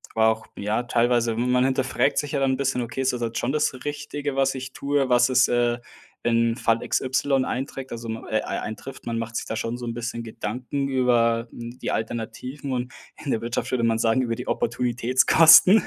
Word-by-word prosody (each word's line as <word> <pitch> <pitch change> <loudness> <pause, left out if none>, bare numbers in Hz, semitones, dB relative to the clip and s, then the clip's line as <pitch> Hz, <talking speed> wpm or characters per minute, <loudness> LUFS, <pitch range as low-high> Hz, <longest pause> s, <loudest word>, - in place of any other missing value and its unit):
war 110 0 +5
auch, 110 0 -6
ja 110 +4 -1
teilweise, 120 -1 +1
man 125 +2 +2
hinterfragt 130 +1 +1
sich 145 - -1
ja 140 - +1
dann 135 -1 +2
'n - - -1
bisschen: 135 -2 0
„Okay, 115 +3 -4
ist 130 0 +2
das 120 - -4
halt 115 -1 -2
schon 120 - 0
das 150 -2 +1
Richtige, 145 -1 -4
was 135 0 +2
ich 130 0 -6
tue, 140 -1 0
was 120 0 +5
ist, 130 0 +4
äh, 120 0 +1 0.4
in 115 0 +2
Fall 115 -2 +1
XY 130 0 +1
einträgt, 135 0 -4
also 115 -1 -6
ma 110 0 -5
äh, 110 -1 +1
ei - - -3
eintrifft?“ 130 +5 -7
Man 115 -1 -2
macht 115 0 -5
sich - - -3
da - - -4
schon 115 +2 -3
so 125 - -6
'n 115 - -3
bisschen 115 0 -4
Gedanken 125 +5 -4
über, 120 -3 +2
hm, 120 +1 -8
die - - -3
Alternativen 125 +5 -4
und 125 +1 -3 0.3
in 145 - -5
der 110 - 0
Wirtschaft 120 +1 -2
würde 125 -2 0
man 115 -1 +1
sagen 115 +3 +2
über 115 -1 -1
die 125 - -7
Opportunitätskosten. 130 - +5
125 Hz, 210 wpm, -24 LUFS, 115-135 Hz, 0.4 s, war